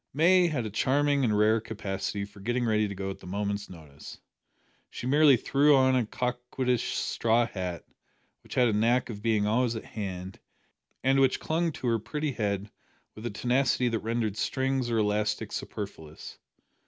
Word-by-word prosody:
May 175 +4 +5
had 140 -8 -2
a 110 - -5
charming 140 +6 +2
and 110 -4 +2
rare 110 +1 +3
capacity 100 -2 -4
for 100 0 -16
getting 120 +4 -1
ready 110 -1 +2
to 100 - -6
go 95 0 -4
out - - -8
at - - -29
a - - -10
moment's 100 +1 -3
notice. 75 -5 -12 0.7
She - - -7
merely 145 0 +5
threw 145 +5 +4
on 130 -1 +4
a 125 -4 +1
coquettish 125 0 -2
straw 115 +1 +1
hat, 90 -6 -5 0.6
which - - -10
had 125 -1 +4
a - - 0
knack 120 +4 +2
of 105 -2 -8
being 110 -2 +1
always 120 +2 +1
at 110 - -6
hand, 95 -3 -6 0.6
and 135 +2 +3
which 135 -1 +3
clung 165 +1 0
to 145 - -7
her 115 -2 +2
pretty 150 +6 -3
head 100 -3 -2 0.4
with 110 +2 -6
a - - -2
tenacity 125 +3 +1
that 115 -1 -1
rendered 110 -2 -2
strings 130 +4 -1
or 115 - 0
elastic 105 0 0
superfluous. 80 -1 -7
115 Hz, 180 wpm, -28 LUFS, 105-130 Hz, 0.7 s, May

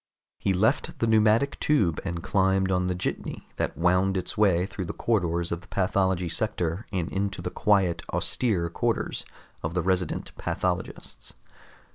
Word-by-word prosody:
He 100 - +1
left 110 - +1
the 115 - +1
pneumatic 110 +4 +3
tube 100 - +2
and 85 -3 -4
climbed 95 -1 +2
on 90 0 +1
the 90 - 0
jitney 90 - -4
that - - -2
wound 90 +3 +3
its 90 - -3
way 95 -4 +3
through 95 -1 -5
the 85 - -4
corridors 85 -6 0
of 85 0 -2
the 95 - -17
pathology 95 -2 +1
sector 85 +1 -2
and 90 -4 -1
into 100 0 -2
the - - -4
quiet, 95 -6 +2
austere 100 -9 0
quarters - - -1 0.4
of 80 +2 -3
the 90 - +1
resident 90 -2 -1
pathologists. 90 0 -3
95 Hz, 155 wpm, -27 LUFS, 90-105 Hz, 0.4 s, pneumatic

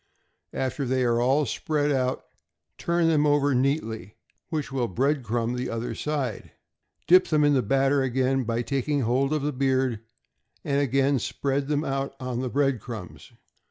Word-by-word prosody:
After 135 +2 -2
they 130 0 0
are 120 -1 +2
all 135 +4 +3
spread 145 +4 -1
out, 130 -2 0 0.6
turn 170 -1 +1
them 150 -2 +3
over 145 -1 +3
neatly, 120 - -1 0.3
which 150 -4 -3
will 130 -3 -1
bread 135 - 0
crumb 120 0 -1
the 125 +1 -3
other 115 +1 -3
side. 150 -4 -3 0.5
Dip 185 +3 +6
them 150 -2 +2
in 145 0 +4
the 130 - +3
batter 135 +5 +2
again 130 +1 +1
by 115 +1 -1
taking 140 +3 -1
hold 130 +4 +1
of 155 -2 0
the 150 0 -1
beard, 130 -3 +1 0.6
and 140 0 +1
again 135 0 +2
spread 140 +3 -2
them 150 0 0
out 135 -1 -3
on 125 -2 -3
the 130 - -2
bread 135 -1 +1
crumbs. 110 -5 -9
135 Hz, 165 wpm, -26 LUFS, 125-145 Hz, 0.6 s, Dip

